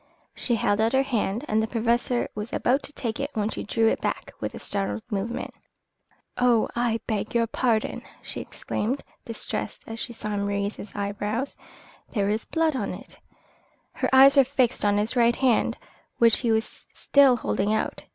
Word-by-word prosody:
She 240 - 0
held 205 -1 +1
out 225 +3 +2
her 265 +1 +4
hand 235 -1 -1
and 215 +1 +2
the 220 - -1
Professor 235 +1 +1
was 210 +2 -5
about 265 +4 +2
to 290 - -8
take 230 -4 -3
it 280 +1 -2
when 215 0 0
she - - -5
drew 225 +2 +1
it - - +1
back - - -3
with - - -4
a - - -6
startled 200 +2 -2
movement. 210 +4 -3 0.9
"Oh, 245 -3 +4
I 235 -1 0
beg 215 +1 -2
your 230 -1 +4
pardon!" 230 -1 0 0.2
she - - -5
exclaimed, 250 +7 -3 0.2
distressed, 225 -1 -4
as 225 0 -6
she 240 - -3
saw 215 -2 -5
him 200 -1 -1
raise 200 +1 -1
his 200 - -10
eyebrows. 205 +6 -2 0.6
"There 200 -4 +1
is 215 +1 -2
blood 320 -3 +1
on - - -2
it." - - -13 0.7
Her - - -1
eyes 270 +2 +8
were 275 - +9
fixed 260 -2 +1
on 205 0 +3
his 215 +4 0
right 235 -1 +4
hand, 255 -4 +2 0.4
which 230 -2 +5
he 235 -3 +1
was 220 +1 +2
still 275 -3 +3
holding 210 -3 -1
out. 220 - -1
230 Hz, 185 wpm, -25 LUFS, 210-250 Hz, 0.9 s, were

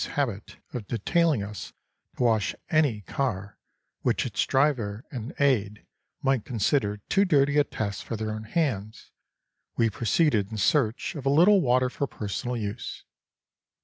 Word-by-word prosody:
's - - 0
habit 115 -8 -3 0.2
of 115 -5 -5
detailing 145 - +1
us 105 0 -7 0.4
to - - 0
wash 110 -3 +2 0.2
any 145 -9 +2
car 100 -3 -3 0.4
which - - +1
its - - 0
driver 130 -5 +1
and 125 -1 -5
aide 105 -7 +1 0.4
might 135 -4 +2
consider 105 -2 0
too 195 - +3
dirty 145 -5 +3
a - - +5
task 100 -7 -4
for 115 - -4
their 110 0 -3
own 110 0 -5
hands) 110 - -2 0.7
we 115 -1 +3
proceeded 115 - +2
in 110 - -6
search 110 - +1
of 145 -5 -6
a 135 - +1
little 180 +8 +6
water 130 -2 +3
for 140 +2 -3
personal 120 +4 -4
use. 105 +1 -5
120 Hz, 150 wpm, -27 LUFS, 105-140 Hz, 0.7 s, little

